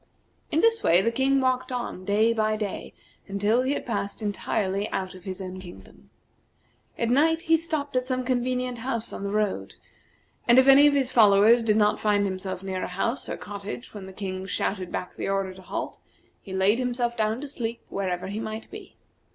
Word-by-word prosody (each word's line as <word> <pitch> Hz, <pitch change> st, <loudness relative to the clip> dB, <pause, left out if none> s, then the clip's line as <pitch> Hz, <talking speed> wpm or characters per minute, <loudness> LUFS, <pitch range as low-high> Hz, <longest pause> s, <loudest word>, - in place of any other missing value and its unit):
In 315 Hz, -, +2 dB
this 455 Hz, -1 st, +3 dB
way 175 Hz, +3 st, +4 dB
the 230 Hz, -, +2 dB
King 270 Hz, +3 st, +2 dB
walked 255 Hz, 0 st, 0 dB
on 240 Hz, -7 st, -4 dB
day 215 Hz, +3 st, +3 dB
by 215 Hz, -1 st, +1 dB
day 210 Hz, -2 st, -5 dB, 0.3 s
until 205 Hz, +4 st, +1 dB
he 260 Hz, +2 st, 0 dB
had -, -, -4 dB
passed 200 Hz, -4 st, -3 dB
entirely 205 Hz, -1 st, -1 dB
out 190 Hz, -1 st, -3 dB
of 185 Hz, 0 st, -14 dB
his 190 Hz, -1 st, -5 dB
own 185 Hz, -1 st, -6 dB
kingdom. 95 Hz, -, -13 dB, 0.9 s
At 235 Hz, 0 st, 0 dB
night 325 Hz, +5 st, +3 dB
he 325 Hz, -2 st, +4 dB
stopped 310 Hz, -4 st, -3 dB
at 255 Hz, 0 st, 0 dB
some 255 Hz, -1 st, -1 dB
convenient 250 Hz, -1 st, -1 dB
house 230 Hz, -2 st, -3 dB
on -, -, -6 dB
the 200 Hz, -, -2 dB
road, 210 Hz, -1 st, -1 dB, 0.7 s
and 240 Hz, +1 st, +6 dB
if 260 Hz, +1 st, +6 dB
any 275 Hz, +2 st, +8 dB
of 290 Hz, -, +3 dB
his 265 Hz, -2 st, +1 dB
followers 215 Hz, +1 st, +6 dB
did 215 Hz, -2 st, +2 dB
not 210 Hz, -1 st, +3 dB
find 205 Hz, -1 st, +2 dB
himself 185 Hz, -1 st, -4 dB
near 190 Hz, -1 st, -3 dB
a -, -, -2 dB
house 230 Hz, +8 st, -2 dB
or -, -, -3 dB
cottage 205 Hz, +4 st, -7 dB
when 200 Hz, -3 st, -8 dB
the -, -, -9 dB
King 190 Hz, -1 st, -5 dB
shouted 185 Hz, -2 st, -2 dB
back 180 Hz, -, -5 dB
the -, -, -3 dB
order 195 Hz, -1 st, -1 dB
to 190 Hz, -, -13 dB
halt, 185 Hz, -, -5 dB, 0.4 s
he 195 Hz, -, -11 dB
laid 190 Hz, +5 st, +2 dB
himself 245 Hz, -1 st, -1 dB
down 220 Hz, +1 st, 0 dB
to 290 Hz, -, -6 dB
sleep 235 Hz, -4 st, -4 dB
wherever 185 Hz, -2 st, -2 dB
he 205 Hz, +3 st, -4 dB
might 220 Hz, 0 st, -6 dB
be. -, -, -10 dB
215 Hz, 200 wpm, -26 LUFS, 195-255 Hz, 0.9 s, any